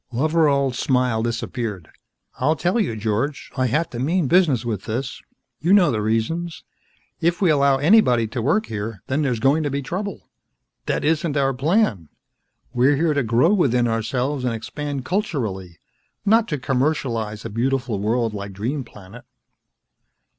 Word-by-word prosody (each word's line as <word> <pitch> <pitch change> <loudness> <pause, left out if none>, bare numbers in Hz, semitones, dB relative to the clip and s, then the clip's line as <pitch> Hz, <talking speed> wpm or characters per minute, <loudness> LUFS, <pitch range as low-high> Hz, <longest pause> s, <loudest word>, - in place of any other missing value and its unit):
Loveral's 140 -1 +1
smile 125 -5 +1
disappeared. 115 -5 -3 0.5
"I'll 150 +5 +2
tell 180 - 0
you, 175 - 0
George. 110 +7 -2
I 130 -1 +1
have 150 +8 0
to 120 - -5
mean 160 +4 +1
business 150 -8 +3
with 110 -5 -3
this. 125 +4 -4 0.4
You 170 +5 +2
know 195 -4 +5
the 110 -3 -1
reasons. 135 +11 -2 0.6
If 170 +1 +1
we 185 -5 +3
allow 140 -2 +3
anybody 145 - +4
to 120 +1 -3
work 205 - +1
here, 105 -2 -5
then 135 +3 -1
there's 125 -6 0
going 140 +6 +3
to 145 - -1
be 140 0 -3
trouble. 190 +5 -5 0.6
That - - -1
isn't 155 -1 +1
our 135 -1 +2
plan. 130 - +1 0.6
We're 130 +4 +3
here 160 +1 +1
to 145 - +1
grow 125 - +3
within 125 - +2
ourselves 125 +4 -1
and 120 -2 0
expand 140 +3 -5
culturally. 110 - -3 0.5
Not 225 +2 +4
to 150 - -2
commercialize 125 -6 -1
a 115 - -5
beautiful 125 -1 -1
world 115 +2 0
like 100 -1 -6
Dream 125 +9 -3
Planet." 100 -5 -13
130 Hz, 155 wpm, -22 LUFS, 115-155 Hz, 0.6 s, know